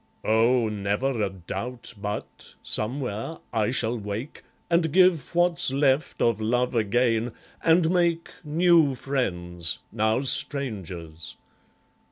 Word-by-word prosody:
Oh, 115 +2 +3
never 105 +4 -1
a 100 - +1
doubt 115 +7 -6
but, 105 0 -6
somewhere, 125 +4 -2 0.2
I 110 -2 +1
shall 120 -2 +1
wake, 110 +5 -6 0.3
And 170 -2 +2
give 180 -4 +3
what's 175 -4 +3
left 135 +1 +1
of 115 -2 +1
love 125 +3 0
again, 115 +1 +1 0.3
and 165 0 +4
make 170 -2 +1
New 160 -2 +3
friends, 90 -11 -2
now 110 +2 +1
strangers. 95 - -2
120 Hz, 110 wpm, -25 LUFS, 105-150 Hz, 0.3 s, and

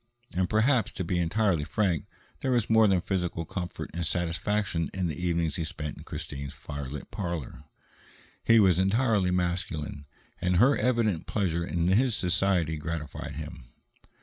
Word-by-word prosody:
And 90 0 +1
perhaps, 110 0 +3
to 95 - -3
be 90 +1 0
entirely 85 -1 +2
frank, 90 +1 0 0.3
there 135 - -1
was 120 -4 +1
more 110 -1 +6
than 95 -3 +3
physical 90 -3 -2
comfort 90 +1 -5
and 85 +1 -2
satisfaction 85 +1 -1
in 95 -1 0
the 85 +1 -3
evenings 85 -1 0
he 85 - -1
spent 75 -2 -5
in - - -11
Christine's 70 -1 -6
firelit 70 -1 -7
parlor. 85 -7 -4 0.8
He 115 0 +6
was 95 -4 +5
entirely 105 0 +3
masculine, 85 -5 -2 0.3
and 90 0 +2
her 125 +10 +6
evident 110 -9 +1
pleasure 85 -5 0
in 85 +1 0
his 115 +5 +3
society 90 -3 +1
gratified 75 -3 -5
him. 75 -5 -7
90 Hz, 150 wpm, -28 LUFS, 80-100 Hz, 0.8 s, more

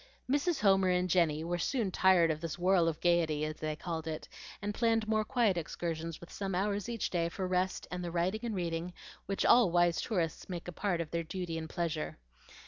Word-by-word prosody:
Mrs. 290 +5 +1
Homer 195 -2 +4
and 180 0 +2
Jenny 160 -3 +2
were 175 +1 -2
soon 220 +1 0
tired 180 -3 +4
of 155 0 -4
this 165 -1 -4
"whirl 180 -1 +3
of 160 -1 -1
gayety," 165 -3 +2
as 155 0 -4
they 155 -1 -3
called 160 0 -4
it, 155 -1 -4 0.3
and 205 +1 -3
planned 225 -1 +1
more 215 0 +2
quiet 225 -6 +2
excursions 165 0 -4
with 170 - -12
some 195 -2 -3
hours 200 +3 -1
each 230 -3 -2
day 170 -2 0
for 185 +2 -3
rest 185 +1 0
and 180 0 -3
the 175 - -3
writing 175 +5 0
and 230 -3 -3
reading 170 -1 -2 0.3
which 195 0 -1
all 240 -6 +6
wise 175 0 +3
tourists 175 -8 -2
make 175 -2 -5
a - - -4
part 180 -1 -1
of 160 - -6
their 170 0 -1
duty 175 0 -4
and 160 -1 -5
pleasure. 165 -3 -3
175 Hz, 215 wpm, -32 LUFS, 165-195 Hz, 0.3 s, all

